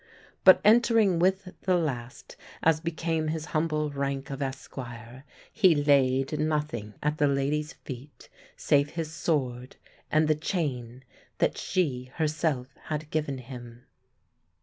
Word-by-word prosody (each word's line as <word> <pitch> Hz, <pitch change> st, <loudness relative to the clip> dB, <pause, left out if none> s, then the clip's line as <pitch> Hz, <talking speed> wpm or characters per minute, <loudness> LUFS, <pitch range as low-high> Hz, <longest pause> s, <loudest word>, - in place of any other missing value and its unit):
But 185 Hz, -, +9 dB
entering 220 Hz, -4 st, +5 dB
with 190 Hz, +1 st, +1 dB
the 185 Hz, -2 st, +2 dB
last, 130 Hz, -7 st, -4 dB, 0.3 s
as 160 Hz, -1 st, +4 dB
became 160 Hz, -1 st, -2 dB
his 155 Hz, 0 st, -2 dB
humble 155 Hz, -1 st, 0 dB
rank 140 Hz, -1 st, -3 dB
of 135 Hz, +1 st, -5 dB
esquire, 130 Hz, -2 st, -7 dB, 0.3 s
he 190 Hz, -7 st, +5 dB
laid 140 Hz, -1 st, +2 dB
nothing 150 Hz, -9 st, -2 dB
at 150 Hz, +1 st, 0 dB
the 145 Hz, -, +4 dB
lady's 145 Hz, +3 st, 0 dB
feet 135 Hz, +2 st, -10 dB, 0.3 s
save 140 Hz, 0 st, +2 dB
his 165 Hz, -2 st, -3 dB
sword 130 Hz, -6 st, -2 dB, 0.3 s
and 155 Hz, 0 st, +3 dB
the 155 Hz, -, +4 dB
chain 135 Hz, -7 st, -3 dB, 0.3 s
that -, -, +1 dB
she 140 Hz, -9 st, -1 dB
herself 155 Hz, -4 st, 0 dB, 0.2 s
had 155 Hz, 0 st, -4 dB
given 150 Hz, -3 st, -1 dB
him. 120 Hz, -1 st, -10 dB
150 Hz, 125 wpm, -28 LUFS, 130-160 Hz, 0.3 s, But